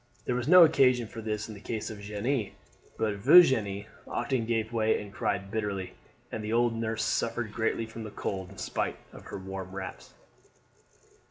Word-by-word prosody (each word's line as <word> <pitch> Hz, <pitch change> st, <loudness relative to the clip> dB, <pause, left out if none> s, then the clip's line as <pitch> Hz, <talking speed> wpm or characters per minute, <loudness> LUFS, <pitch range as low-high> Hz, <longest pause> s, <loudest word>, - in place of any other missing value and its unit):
There -, -, 0 dB
was 125 Hz, +1 st, -2 dB
no 180 Hz, +2 st, +9 dB
occasion 130 Hz, -7 st, +4 dB
for 115 Hz, +1 st, -8 dB
this 105 Hz, -1 st, -3 dB
in 110 Hz, -, -8 dB
the 100 Hz, -, -10 dB
case 110 Hz, +1 st, -4 dB
of 105 Hz, -, -8 dB
Jeanne, 105 Hz, +3 st, -2 dB, 0.4 s
but 105 Hz, -2 st, 0 dB
Virginie 105 Hz, -, +5 dB, 0.2 s
often 125 Hz, -5 st, -1 dB
gave 115 Hz, 0 st, -1 dB
way 110 Hz, -1 st, +2 dB
and 105 Hz, -1 st, -9 dB
cried 100 Hz, 0 st, -2 dB
bitterly, 100 Hz, -4 st, -3 dB, 0.4 s
and 110 Hz, -, -4 dB
the 110 Hz, +1 st, -2 dB
old 120 Hz, 0 st, +3 dB
nurse 115 Hz, -1 st, -2 dB
suffered 115 Hz, -2 st, -1 dB
greatly 115 Hz, 0 st, 0 dB
from 115 Hz, 0 st, -8 dB
the 110 Hz, -, -6 dB
cold 95 Hz, -2 st, -4 dB
in 95 Hz, -, -14 dB
spite -, -, -2 dB, 0.2 s
of -, -, -12 dB
her -, -, -6 dB
warm 95 Hz, 0 st, -7 dB
wraps. 95 Hz, -1 st, -8 dB
110 Hz, 180 wpm, -29 LUFS, 100-115 Hz, 0.4 s, no